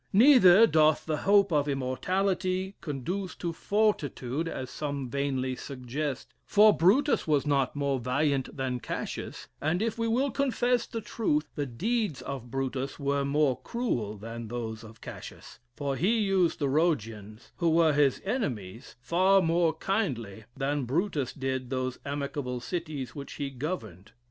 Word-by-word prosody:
Neither 225 -3 +8
doth 155 -5 +3
the 155 -1 -1
hope 200 -3 +5
of 145 -1 +2
immortality 185 +8 -1
conduce 180 +7 -4
to 170 -1 -3
fortitude, 165 - 0
as 130 -5 -5
some 140 -4 -4
vainly 135 -2 -1
suggest, 135 +1 -5
for 210 0 +5
Brutus 220 - +3
was 150 -2 +2
not 140 -2 +1
more 140 -2 0
valiant 135 +2 0
than 130 -2 -2
Cassius; - - -5
and 160 +4 +1
if 225 +1 -2
we 230 - +1
will 255 +5 +1
confess 250 -3 +1
the 230 -2 -5
truth, 155 -10 -1
the 145 -1 -3
deeds 205 - -1
of 130 -3 -6
Brutus 135 +1 -3
were 140 -1 0
more 140 -1 +1
cruel 120 - -2
than 115 +2 -7
those 115 -1 -5
of 110 0 -13
Cassius; - - -10 0.2
for 140 -2 -2
he 205 - +2
used 195 -5 +2
the 145 - 0
Rhodians, 115 - -1
who 170 -2 +2
were 160 -1 +4
his 145 -2 +2
enemies, 125 - -3
far 185 +8 +4
more 165 -1 +2
kindly 125 - -2
than 140 0 -1
Brutus 145 - -1
did 130 -2 -3
those 130 -1 -2
amicable 140 -3 -3
cities 155 -3 -4
which 140 -1 -8
he 140 -2 -4
governed. 115 - -6
145 Hz, 150 wpm, -28 LUFS, 130-185 Hz, 0.2 s, Neither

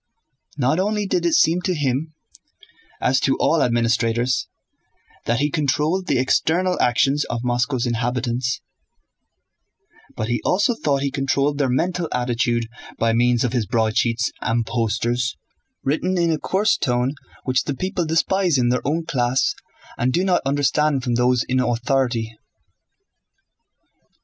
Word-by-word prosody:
Not 140 +5 +1
only 210 +2 0
did 175 -3 0
it 170 - +2
seem 165 +3 +3
to 185 -1 -1
him 145 +2 -2 0.8
(as 130 +1 +2
to 135 0 +1
all 165 - +2
administrators) 120 +1 +1 0.8
that 120 +3 +1
he 145 0 +1
controlled 155 +5 0
the 135 - +2
external 170 +8 +1
actions 135 +4 +2
of 120 0 -4
Moscow's 125 +1 0
inhabitants, 120 +1 -1 1.5
but 110 - -3
he 120 0 -1
also 205 +6 +2
thought 140 -10 -1
he 140 - -1
controlled 140 +1 0
their 135 -3 +1
mental 170 +6 -1
attitude 120 -1 0 0.3
by 115 0 +1
means 120 0 +2
of 125 -1 -1
his 120 -5 0
broadsheets 115 0 +1
and 115 -1 0
posters, 120 +2 -1 0.5
written 170 +7 0
in 170 -1 +2
a 155 - -1
coarse 200 +7 +1
tone 125 +1 0 0.3
which 130 -1 0
the 145 - -2
people 185 +3 -2
despise 165 +1 +1
in 120 -1 +2
their 125 +1 +1
own 160 +4 -1
class 125 -2 +1 0.5
and 125 +1 +1
do 180 - +2
not 185 -2 +2
understand 145 0 +1
from 120 -2 -1
those 125 0 +2
in 130 0 +1
authority. 120 -2 0
130 Hz, 140 wpm, -21 LUFS, 120-155 Hz, 1.5 s, seem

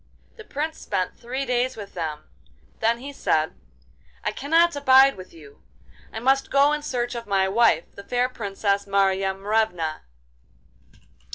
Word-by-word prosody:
The 440 - -11
Prince 315 -3 -4
spent 185 - -2
three 255 +3 -4
days 250 0 0
with 205 -2 -9
them; 155 -3 -4 0.6
then 230 +1 +2
he 275 +4 -8
said: - - 0 0.7
'I - - 0
cannot 330 +3 +2
abide 270 -1 +6
with 185 -1 -11
you; 150 -4 -16 0.5
I 220 - -5
must 270 +3 +2
go 280 +2 +4
in 300 - -2
search 245 -4 -2
of 235 -2 -6
my 195 -1 +2
wife, 195 -5 +3
the 200 - -11
fair 245 +3 0
Princess 200 -4 -2
Marya 195 -1 +1
Morevna. 195 -6 -1
230 Hz, 150 wpm, -24 LUFS, 195-270 Hz, 0.7 s, abide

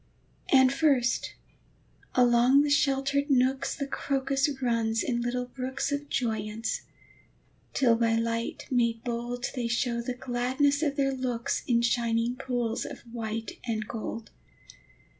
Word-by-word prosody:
And 260 -1 +6
first, 275 -5 +1 0.8
along 250 +3 +5
the 295 - 0
sheltered 280 0 +2
nooks, 265 0 +2
The 280 - -3
crocus 275 0 0
runs 230 -3 +1
in 240 -2 -1
little 250 +1 -1
brooks 260 +3 -3
Of 285 0 -3
joyance, 220 -3 -2 0.9
till 245 -4 +4
by 230 -1 +2
light 230 0 -2
made 235 -2 +1
bold 240 +1 -3
They 245 -3 -2
show 235 0 0
the 245 +1 -4
gladness 260 +3 0
of 290 -3 0
their 275 -1 +1
looks 250 -3 -2
In 235 -1 +3
shining 235 0 +1
pools 245 -3 -2
of - - -8
white 225 -2 -5
and 215 -2 -2
gold. 225 0 -6
245 Hz, 130 wpm, -28 LUFS, 230-270 Hz, 0.9 s, And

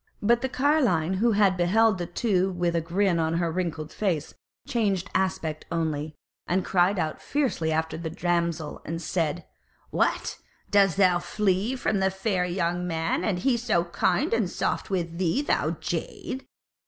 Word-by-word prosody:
But 235 +3 +3
the 265 - -1
carline 255 - +2
who 230 +3 +3
had 200 -2 +4
beheld 190 +3 +3
the 175 - -3
two 190 0 +1
with 175 -2 -1
a 165 - +2
grin 175 +1 +1
on 160 0 +1
her 170 -1 0
wrinkled 160 -3 -3
face 170 -8 -1 0.3
changed 200 -5 0
aspect 165 -5 -1
also, 155 -2 -2 0.3
and 185 +1 +1
cried 185 +2 +3
out 155 -3 -2
fiercely 255 - 0
after 160 0 -1
the 165 -1 -4
damsel, 170 -2 -1
and 165 +2 -4
said: 170 -1 -2 0.5
"What! - - 0 0.3
dost 195 -4 +4
thou 180 -3 +4
flee 195 +5 0
from 220 -5 0
the 190 0 +3
fair 190 -1 -1
young 175 0 -1
man, 165 -1 -1
and 200 -5 0
he 240 +6 +2
so 225 -8 +1
kind 175 +3 0
and 225 -5 +1
soft - - -2
with 170 -3 -2
thee, 190 - +1
thou - - 0
jade? 265 - -4
180 Hz, 165 wpm, -26 LUFS, 170-205 Hz, 0.5 s, had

